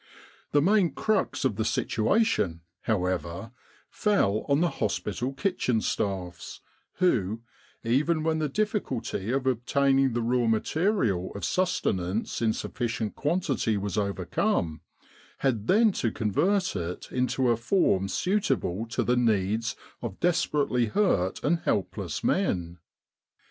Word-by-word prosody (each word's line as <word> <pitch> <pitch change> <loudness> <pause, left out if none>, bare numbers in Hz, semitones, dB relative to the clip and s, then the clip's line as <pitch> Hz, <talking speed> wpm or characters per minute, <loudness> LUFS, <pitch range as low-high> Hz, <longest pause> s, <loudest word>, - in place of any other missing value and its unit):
The 145 -1 +3
main 190 -4 +3
crux 215 -9 0
of 105 -6 0
the 110 - +1
situation, 110 - +1 0.2
however, 90 0 -1 0.4
fell 110 - +1
on 140 +1 +4
the 175 +1 +2
hospital 110 +3 -1
kitchen 135 - 0
staffs, 90 -5 -3 0.3
who, 115 - +1 0.4
even 150 +7 +1
when 160 0 +1
the 155 -1 0
difficulty 135 - -2
of 130 +1 0
obtaining 135 +1 +2
the 120 0 -1
raw 120 0 +1
material 115 - +1
of 100 - -3
sustenance 105 - -1
in 115 -1 +3
sufficient 115 -1 -3
quantity 145 - 0
was 100 -1 -3
overcome, 100 -5 -1 0.6
had 115 -6 -1
then 220 +2 +5
to 115 - -1
convert 175 - +1
it 90 -1 -5
into 125 0 +1
a - - +3
form 115 - +2
suitable 125 - 0
to 115 - -1
the 125 - +2
needs 110 -2 +1 0.3
of 95 - -6
desperately 145 -8 +1
hurt 105 - +1
and 165 +3 +2
helpless 95 - -2
men. 90 - 0
120 Hz, 125 wpm, -27 LUFS, 100-160 Hz, 0.6 s, then